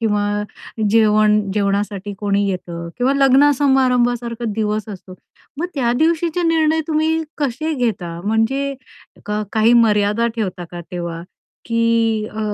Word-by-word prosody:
किंवा 210 -2 0 0.6
जेवण 215 -1 +4
जेवणासाठी 200 0 -1
कोणी 205 -1 0
येतं 170 -2 -5
किंवा 255 +2 +2
लग्न 275 +1 +5
समारंभासारखा 245 -4 +1
दिवस 215 -1 -2
असतो. 190 -2 -9 0.4
मग 345 - -1
त्या 245 -5 +1
दिवशीचे 335 +2 +1
निर्णय 320 -1 +2
तुम्ही 320 +1 +1 0.2
कसे 295 +3 -2
घेता? 190 - -2
म्हणजे 225 +6 0 0.5
क 210 0 -1
काही 220 +2 +4
मर्यादा 215 -1 +3
ठेवता 185 -5 -3
का 175 - -7
तेव्हा? 170 -1 -5 0.4
की 230 -2 +1
अ, 220 - -4
225 Hz, 125 wpm, -19 LUFS, 205-270 Hz, 0.6 s, लग्न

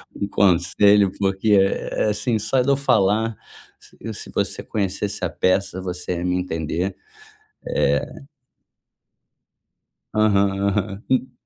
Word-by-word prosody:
um - - -2
conselho. 100 +2 +4
Porque, 95 +2 0
é 95 - -1
assim, 105 +2 -1
só 130 +5 +1
de 130 - -1
eu 140 - +3
falar 110 -4 +2 0.8
se - - -9
você - - -2
conhecesse 100 -1 -3
a 85 - -1
peça, 95 +2 0
você 90 0 -4
ia 85 - -4
me 90 0 0
entender, 85 +1 -2 0.7
é - - 0 1.9
Aham, 100 -2 +3 0.2
aham. 100 0 -1
En 130 0 +1
100 Hz, 115 wpm, -22 LUFS, 90-105 Hz, 1.9 s, conselho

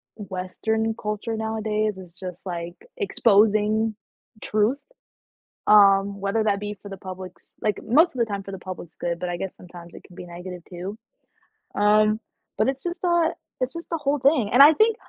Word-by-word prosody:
western 220 +3 -2
culture 210 +2 -3
nowadays 215 -1 -1
is 180 -3 -12
just, 180 -1 -8
like, 175 -1 -5 0.2
exposing 215 - +3 0.5
truth, 215 +5 +1 0.9
um, 200 -1 +5
whether 200 +3 0
that 200 -2 +1
be 210 0 -4
for 205 - -10
the 195 - -7
public's 185 0 -10
like, 210 -2 -1
most 315 +10 +4
of - - -8
the 235 - +3
time 200 -3 -4
for 195 - -9
the 195 - -6
public's 180 -2 -8
good, 170 -1 -2
but 180 - -3
I 175 - -2
guess 190 +1 -5
sometimes 175 -1 -13
it - - -12
can 180 - -16
be - - -8
negative 175 +1 -8
too. 185 +3 -6 0.8
Um, 215 +1 +4 0.4
but 215 - +2
it's 270 0 -4
just 350 +1 -4
that 345 -2 +2 0.3
it's 255 - 0
just 335 0 -7
the 330 - -1
whole 290 -1 0
thing, 265 -5 +3
and 250 - +7
I 300 +2 +9
think, 435 +6 +3
210 Hz, 185 wpm, -24 LUFS, 185-225 Hz, 0.9 s, I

